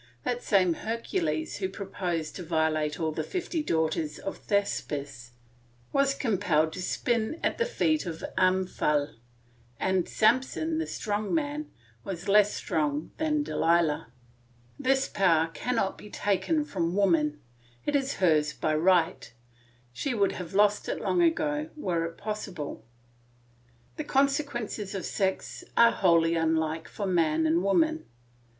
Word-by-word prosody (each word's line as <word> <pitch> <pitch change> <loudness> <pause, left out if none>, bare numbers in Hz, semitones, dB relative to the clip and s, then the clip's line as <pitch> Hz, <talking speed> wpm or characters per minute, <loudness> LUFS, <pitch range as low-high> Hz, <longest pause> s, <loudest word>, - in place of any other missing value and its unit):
That 245 -1 -1
same 185 -5 +3
Hercules 165 -7 -2
who 190 -2 -2
proposed 185 -5 -4
to 180 - -6
violate 160 -2 0
all 160 -1 0
the 155 +1 -3
fifty 350 - -3
daughters 160 - -1
of 195 - -5
Thespis 140 - -2 0.6
was 275 0 +3
compelled 175 - +1
to 185 - -5
spin 235 - -1
at - - 0
the 470 - +2
feet 310 - +1
of 165 -1 -6
Omphale, 180 -6 +1 0.7
and 190 -2 +1
Samson, 265 +8 +2
the 325 - -2
strong 210 +5 -2
man, 300 -1 -2 0.3
was 190 0 -6
less 210 +1 +5
strong 150 -1 -2
than 305 -1 +1
Delilah. 165 - +1 0.7
This 270 0 +2
power 165 -4 +2
cannot 230 -4 -1
be 210 - -11
taken 295 - 0
from 175 - -2
woman; 165 -7 +2 0.5
it 295 - 0
is 275 -1 0
hers 155 -4 +2
by 155 +2 -1
right; 170 0 +2 0.6
she 260 - -2
would 200 -3 +2
have 180 0 -7
lost 210 0 +3
it - - -2
long 355 - +1
ago, 305 -2 +1
were 175 - -1
it 165 0 -7
possible. 195 - -5 1.1
The - - -2
consequences 270 -8 0
of 190 - -3
sex 190 -2 -2
are 235 0 +7
wholly 165 0 +3
unlike 160 0 0
for 205 - -5
man 160 -4 +2
and 160 +2 +3
woman. 315 - +2
190 Hz, 135 wpm, -28 LUFS, 160-245 Hz, 1.1 s, are